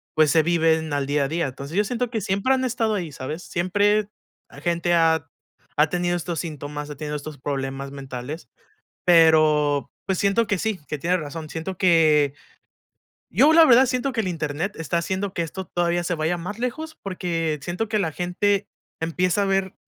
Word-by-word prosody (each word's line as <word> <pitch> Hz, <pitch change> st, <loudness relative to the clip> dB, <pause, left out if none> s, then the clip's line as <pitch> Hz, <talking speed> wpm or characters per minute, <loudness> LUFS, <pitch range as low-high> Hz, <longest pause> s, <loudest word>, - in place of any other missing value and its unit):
pues, 155 Hz, -2 st, +4 dB
se 160 Hz, -, +5 dB
viven 160 Hz, -2 st, +2 dB
al 140 Hz, -1 st, 0 dB
día 140 Hz, 0 st, +1 dB
a -, -, -1 dB
día. 165 Hz, +1 st, -1 dB
Entonces, 140 Hz, +4 st, -8 dB
yo 205 Hz, -, +3 dB
siento 245 Hz, +2 st, -2 dB
que 225 Hz, -3 st, -2 dB
siempre 200 Hz, +7 st, +1 dB
han 260 Hz, 0 st, 0 dB
estado 230 Hz, -3 st, 0 dB
ahí, 170 Hz, -6 st, -3 dB
¿sabes? 150 Hz, +6 st, -6 dB
Siempre 205 Hz, +4 st, +1 dB, 0.6 s
gente 175 Hz, 0 st, +1 dB
ha 160 Hz, -3 st, +3 dB, 0.5 s
ha 150 Hz, +1 st, +4 dB
tenido 175 Hz, +1 st, 0 dB
estos 175 Hz, -1 st, -3 dB
síntomas, 150 Hz, -2 st, -6 dB
ha 150 Hz, -, -6 dB
tenido 150 Hz, +1 st, -4 dB
estos 150 Hz, 0 st, -8 dB
problemas 135 Hz, 0 st, -4 dB
mentales, 135 Hz, +1 st, -7 dB, 0.6 s
pero, 155 Hz, -4 st, +4 dB, 0.2 s
pues, 190 Hz, -2 st, 0 dB
siento 200 Hz, +4 st, +2 dB
que 205 Hz, -3 st, +1 dB
sí, 215 Hz, -1 st, -2 dB
que 150 Hz, -, -3 dB
tienes 175 Hz, +5 st, 0 dB
razón, 155 Hz, 0 st, -7 dB
siento 170 Hz, +3 st, -5 dB
que 155 Hz, -6 st, +4 dB, 1.0 s
yo, 275 Hz, -, +5 dB
la 330 Hz, 0 st, +8 dB
verdad 260 Hz, -2 st, +6 dB
siento 255 Hz, +2 st, -1 dB
que 230 Hz, -, -1 dB
el 190 Hz, -, -1 dB
Internet 160 Hz, +3 st, -3 dB
está 165 Hz, +1 st, -1 dB
haciendo 190 Hz, +3 st, -2 dB
que 170 Hz, -, 0 dB
esto 190 Hz, +4 st, -5 dB
todavía 175 Hz, +1 st, 0 dB
se 175 Hz, -, -1 dB
vaya 160 Hz, +2 st, 0 dB
más 205 Hz, +6 st, -6 dB
lejos, 315 Hz, +6 st, -4 dB
porque 165 Hz, -5 st, -2 dB
siento 180 Hz, +8 st, -3 dB
que 215 Hz, 0 st, 0 dB
la 160 Hz, -6 st, -1 dB
gente 195 Hz, +4 st, 0 dB, 0.3 s
empieza 180 Hz, +4 st, +1 dB
a -, -, +2 dB
ver 195 Hz, -1 st, 0 dB
170 Hz, 185 wpm, -23 LUFS, 150-195 Hz, 1.0 s, la